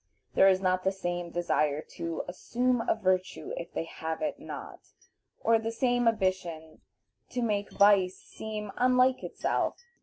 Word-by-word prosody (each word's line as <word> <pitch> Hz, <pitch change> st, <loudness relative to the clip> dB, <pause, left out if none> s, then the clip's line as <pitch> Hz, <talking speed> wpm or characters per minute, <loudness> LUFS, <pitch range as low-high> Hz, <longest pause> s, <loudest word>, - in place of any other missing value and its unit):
There 195 Hz, -, +6 dB
is 190 Hz, -1 st, +4 dB
not 185 Hz, -1 st, +1 dB
the 190 Hz, -, +2 dB
same 175 Hz, -2 st, -3 dB
desire 155 Hz, -4 st, +1 dB
to 165 Hz, -1 st, -4 dB
"assume 245 Hz, +7 st, 0 dB
a -, -, +4 dB
virtue, 185 Hz, -3 st, -1 dB
if 170 Hz, -, -6 dB
they -, -, -2 dB
have 160 Hz, -, -5 dB
it 300 Hz, -, -2 dB
not," -, -, -8 dB, 0.6 s
or 225 Hz, 0 st, +4 dB
the 225 Hz, 0 st, -3 dB
same 245 Hz, 0 st, +1 dB
ambition 185 Hz, -7 st, -1 dB, 0.5 s
to 250 Hz, -1 st, -2 dB
make 205 Hz, -3 st, 0 dB
vice 200 Hz, -2 st, +4 dB
seem 215 Hz, -2 st, -6 dB
unlike 255 Hz, +1 st, +4 dB
itself. -, -, -1 dB
195 Hz, 150 wpm, -29 LUFS, 175-230 Hz, 0.6 s, There